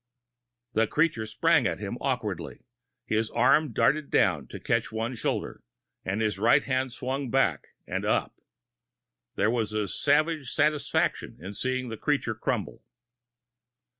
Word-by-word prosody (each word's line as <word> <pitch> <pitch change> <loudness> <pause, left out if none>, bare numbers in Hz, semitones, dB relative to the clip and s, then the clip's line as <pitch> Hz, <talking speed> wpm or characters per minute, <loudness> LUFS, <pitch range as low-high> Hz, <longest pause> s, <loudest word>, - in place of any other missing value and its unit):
The 110 0 +3
creature 150 -8 +1
sprang 105 - +3
at - - -2
him - - -5
awkwardly. - - -3 0.4
His 110 0 0
arm 155 -1 +3
darted 155 -1 +2
down 75 -8 +2
to - - -8
catch - - 0
one 115 +3 -2
shoulder, 120 - -3 0.4
and 100 +4 -2
his 105 -3 0
right 115 +3 +5
hand 130 -1 -1
swung 130 +2 -3
back 115 - 0
and - - -3
up. - - 0 1.0
There 110 - +2
was 110 -3 -1
a 105 -1 0
savage 150 - +1
satisfaction 150 0 0
in 95 +5 -7
seeing 130 +2 -2
the 115 - -5
creature 145 -5 0
crumple. - - -3
120 Hz, 135 wpm, -27 LUFS, 110-140 Hz, 1.0 s, right